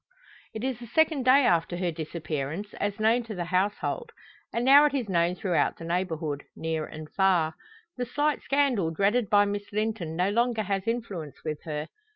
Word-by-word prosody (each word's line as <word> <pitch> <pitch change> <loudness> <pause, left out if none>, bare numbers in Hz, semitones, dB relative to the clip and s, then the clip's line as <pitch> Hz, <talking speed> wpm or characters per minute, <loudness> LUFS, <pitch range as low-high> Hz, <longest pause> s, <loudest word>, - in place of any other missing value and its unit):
It 220 - -4
is 260 -3 -2
the 240 - -9
second 305 +1 +2
day 260 +1 +6
after 170 -1 +2
her 180 -1 -1
disappearance, 160 +3 -4
as 205 +1 -2
known 225 +3 +3
to 220 -2 -6
the 175 - -2
household; 200 - -1 0.4
and 235 +1 -1
now 280 +3 +8
it 290 -2 +1
is 250 -5 -1
known 175 -1 +1
throughout 180 -2 0
the 165 - -8
neighbourhood, 165 -4 -2
near 160 -1 -2
and 155 0 -9
far. 180 -5 +3 0.4
The 245 -1 -2
slight 290 +3 0
scandal 275 - +1
dreaded 200 +7 +1
by 205 0 +5
Miss 205 0 -4
Linton 210 -6 -2
no 180 +4 +1
longer 235 0 +1
has 195 +1 -2
influence 205 - -4
with 155 -1 -3
her. 150 -1 -4
200 Hz, 185 wpm, -27 LUFS, 165-235 Hz, 0.4 s, now